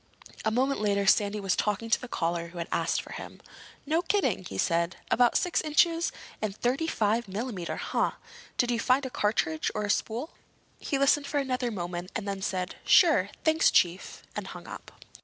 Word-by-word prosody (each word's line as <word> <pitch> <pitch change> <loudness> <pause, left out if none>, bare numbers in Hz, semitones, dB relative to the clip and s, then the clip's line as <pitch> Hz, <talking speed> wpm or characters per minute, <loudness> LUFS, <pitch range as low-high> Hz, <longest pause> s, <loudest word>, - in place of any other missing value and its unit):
A 220 - +2
moment 260 +3 +1
later 200 -1 +1
Sandy 205 +1 +3
was 195 -2 0
talking 210 +2 -1
to - - +3
the 250 - -6
caller 170 -5 -2
who 170 +1 -12
had 170 0 -3
asked - - 0
for - - -12
him. - - -8 0.5
"No 320 +3 +1
kidding?" 310 - 0
he 95 - -6
said. 170 - +1 0.2
"About 245 0 +4
six 360 -2 +1
inches? 330 +2 +2 0.3
And 210 -2 -2
thirty 265 +7 0
five 225 -4 +1
millimeter, 200 -3 -4
huh? - - -1 0.4
Did 245 0 +2
you 235 - 0
find 260 +4 +2
a 260 - -5
cartridge 205 - 0
or 210 - -1
a 205 - +1
spool?" 235 +8 -2 0.5
He 280 - -1
listened 280 +1 +3
for 290 - -2
another 255 -3 0
moment 175 -3 -4
and 220 -3 -3
then 195 -1 -3
said 185 -1 -3
"Sure. 300 - +5
Thanks, 315 0 +4
Chief," 180 +1 +1
and - - -4
hung - - -9
up. - - -9
220 Hz, 190 wpm, -28 LUFS, 190-270 Hz, 0.5 s, Sure